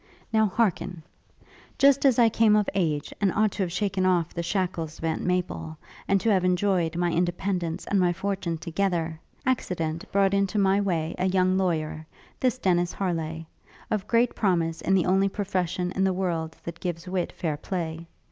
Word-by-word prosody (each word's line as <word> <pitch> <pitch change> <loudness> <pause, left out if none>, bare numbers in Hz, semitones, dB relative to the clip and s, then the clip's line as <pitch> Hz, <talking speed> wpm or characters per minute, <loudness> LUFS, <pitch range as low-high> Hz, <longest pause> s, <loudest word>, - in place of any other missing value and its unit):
'Now 220 -1 +4
hearken! 185 -5 -1 0.7
'Just 280 0 +5
as 260 - +3
I 235 -2 +6
came 225 -1 +4
of 210 -1 +2
age, 155 -6 -1
and 195 -2 +3
ought 215 +2 +2
to - - -4
have 180 -3 -1
shaken 190 0 -1
off 175 -3 +2
the 170 - -2
shackles 175 -3 -2
of - - -12
Aunt 160 -1 -1
Maple, 180 -3 -2 0.3
and 195 - +3
to 225 - +2
have 190 -3 +3
enjoyed 180 -2 +1
my 175 0 +1
independence 175 0 -1
and 200 - +1
my 180 -1 +3
fortune 185 -2 -2
together, 170 -1 -1 0.3
accident 165 -10 -2
brought 195 0 +3
into 200 +1 +1
my 195 0 +3
way 165 -5 -1
a 185 - +2
young 185 0 +2
lawyer 160 -4 -1 0.4
this 255 -1 +1
Dennis 175 -6 +1
Harleigh 165 -3 -3 0.5
of 210 -2 -1
great 235 +1 +3
promise 170 -5 0
in 190 - +2
the 185 - +2
only 195 +2 +3
profession 185 -3 -2
in 190 - 0
the 190 -1 +2
world 170 -4 -2
that 170 0 -7
gives 175 -1 -4
wit 180 -1 -1
fair 160 -4 -2
play. 165 0 -4
185 Hz, 180 wpm, -26 LUFS, 170-195 Hz, 0.7 s, I